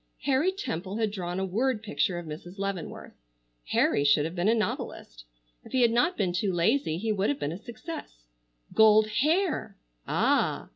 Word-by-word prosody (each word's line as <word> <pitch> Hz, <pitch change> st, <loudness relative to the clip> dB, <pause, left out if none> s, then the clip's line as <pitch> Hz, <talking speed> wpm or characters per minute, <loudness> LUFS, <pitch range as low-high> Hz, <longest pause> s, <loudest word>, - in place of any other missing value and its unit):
Harry 285 Hz, +7 st, +2 dB
Temple 200 Hz, -, -4 dB
had 220 Hz, -2 st, 0 dB
drawn 180 Hz, -2 st, -4 dB
a 190 Hz, -, 0 dB
word 225 Hz, +4 st, 0 dB
picture 205 Hz, -3 st, 0 dB
of 175 Hz, -, -6 dB
Mrs. 160 Hz, +5 st, -9 dB
Leavenworth. 195 Hz, -3 st, -5 dB, 0.5 s
Harry 140 Hz, -, +2 dB
should 145 Hz, +1 st, +4 dB
have 165 Hz, -, -4 dB
been 180 Hz, +2 st, 0 dB
a 225 Hz, -, +4 dB
novelist. -, -, -4 dB, 0.4 s
If -, -, -14 dB
he 255 Hz, -1 st, +4 dB
had 235 Hz, -, +4 dB
not 245 Hz, +10 st, +2 dB
been 185 Hz, -3 st, 0 dB
too 195 Hz, +2 st, 0 dB
lazy 175 Hz, -, +1 dB
he 220 Hz, +4 st, -1 dB
would 200 Hz, -4 st, +1 dB
have 145 Hz, -, 0 dB
been 145 Hz, +1 st, -2 dB
a 170 Hz, -, -5 dB
success. 235 Hz, -, -9 dB, 0.5 s
Gold 215 Hz, 0 st, +6 dB, 0.2 s
hair! 310 Hz, -, 0 dB, 0.3 s
Ah! -, -, +1 dB
200 Hz, 180 wpm, -28 LUFS, 175-235 Hz, 0.5 s, Gold